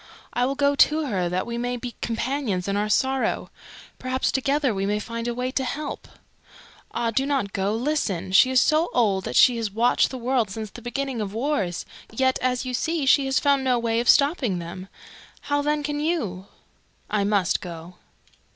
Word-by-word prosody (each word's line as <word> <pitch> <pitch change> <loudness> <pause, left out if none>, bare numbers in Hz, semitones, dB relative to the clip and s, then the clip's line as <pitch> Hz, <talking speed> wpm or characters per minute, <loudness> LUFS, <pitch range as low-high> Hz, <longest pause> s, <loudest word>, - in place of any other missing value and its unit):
I 245 +1 +1
will 275 - -2
go 285 0 +2
to 305 +2 +3
her 185 -9 -1
that 180 +1 -1
we 235 0 -4
may 245 +1 -2
be 245 0 -6
companions 230 -5 -2
in 200 - 0
our 210 +1 0
sorrow. 265 +4 0 0.5
Perhaps 255 0 -1
together 275 -1 +1
we 195 0 -2
may 210 +1 +1
find 230 +2 -5
a 240 - -1
way 250 +1 -2
to 265 - -1
help." 290 +4 -5 0.8
"Ah, 230 -1 -1
do 265 +4 +1
not 270 -8 -1
go. 200 +2 0
Listen! 225 - -1
She 195 +7 +6
is 260 -1 +4
so 310 +6 +3
old 200 -6 +2
that 125 - -4
she 245 -2 +6
has 225 -2 -2
watched 230 +5 +2
the 260 - -6
world 245 -3 0
since 215 +1 -6
the 240 - -11
beginning 255 0 -3
of 205 0 -5
wars, 225 - -1 0.3
yet, 260 +3 +1
as 250 0 0
you 255 - -4
see, 320 +3 -1
she 270 +1 +4
has 265 - +2
found 280 -2 +2
no 255 -2 +2
way 230 -1 0
of 235 - 0
stopping 280 - +3
them. 175 +2 -7 0.5
How 290 0 0
then 295 +1 0
can 295 0 -2
you?" 225 - -2 0.6
"I 210 -1 0
must 200 -3 +1
go." 170 0 -9
245 Hz, 195 wpm, -24 LUFS, 205-275 Hz, 0.8 s, She